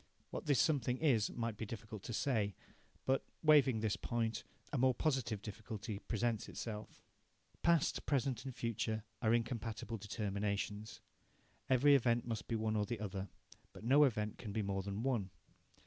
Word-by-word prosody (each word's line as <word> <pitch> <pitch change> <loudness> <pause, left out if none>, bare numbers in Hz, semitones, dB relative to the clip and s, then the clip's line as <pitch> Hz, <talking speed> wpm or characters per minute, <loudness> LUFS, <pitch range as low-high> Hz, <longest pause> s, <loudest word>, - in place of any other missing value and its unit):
What - - -5
this 140 -5 +4
something 130 -5 +2
is 125 -9 +3
might 115 -3 -3
be 110 - -3
difficult 110 -2 -7
to - - -4
say. 110 -5 +1 0.5
But, 135 +1 +2 0.2
waiving 140 -7 +6
this 110 -2 +1
point, 115 -2 -1 0.3
a - - +1
more 130 0 +4
positive 120 -8 0
difficulty 105 -1 -5
presents 115 0 -1
itself. 105 -2 -6 0.6
Past, 170 -3 +3
present, 135 -4 +1
and 130 -3 -6
future 110 -1 -1 0.2
are 110 -2 +3
incompatible 115 -1 -1
determinations. 105 0 -3 0.7
Every 135 +3 +6
event 120 -3 +3
must 115 -2 -3
be 115 - -1
one 110 0 0
or 105 -1 +2
the 120 -3 -3
other, 100 -2 -4 0.4
but - - -11
no 140 +6 +6
event 105 -6 +1
can 110 - -5
be 110 +1 -1
more 100 -1 -1
than 100 +3 -3
one. 120 -8 0
115 Hz, 160 wpm, -37 LUFS, 105-125 Hz, 0.7 s, waiving